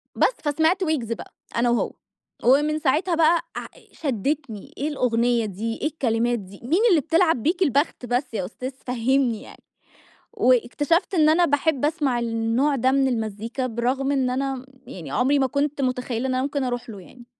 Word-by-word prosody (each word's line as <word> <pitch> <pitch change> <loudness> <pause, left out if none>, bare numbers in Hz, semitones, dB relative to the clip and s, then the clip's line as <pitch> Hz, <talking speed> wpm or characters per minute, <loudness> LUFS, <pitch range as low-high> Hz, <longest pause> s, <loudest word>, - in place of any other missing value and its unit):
بس، - - +3
فسمعت 320 +6 +2
ويجز 295 -9 -1
بقى - - -10 0.2
أنا 240 +1 +2
وهو. 240 - +1 0.5
ومن 295 +5 +3
ساعتها 315 +5 +1
بقى 330 +1 +4
ع - - -4 0.3
شدِّتني، 270 -4 -3
إيه 285 - -2
الأغنية 240 -4 +1
دي، 215 +3 -4
إيه - - +1
الكلمات 240 -5 0
دي، 195 0 -12
مين 320 - +1
اللي 340 -7 +4
بتلعب 325 -5 +2
بيك 345 +4 0
البخت 285 -3 0
بس 245 +1 -1
يا 190 -5 -2
أستاذ 255 +7 -6 0.2
فهمني 250 -1 +1
يعني؟ - - -14 0.7
واكتشفت 290 - +2
إن 310 -4 +4
أنا 340 +3 +4
باحب 290 -1 +1
أسمع 295 -6 0
النوع 230 +5 0
ده 260 0 +2
من 270 0 +3
المزيكا 230 +2 -3
برغم 255 +4 -1
إن 265 -3 +1
أنا 265 0 -2 0.2
يعني 160 -7 -8
عُمري 270 - +2
ما 265 - +2
كنت 285 +2 -1
مُتخيّلة 250 -1 -1
إن 260 - -1
أنا 255 - +1
ممكن 280 0 -2
أروح 245 -1 -3
له 210 -3 -8
يعني. 240 +6 -15
260 Hz, 170 wpm, -23 LUFS, 235-300 Hz, 0.7 s, بقى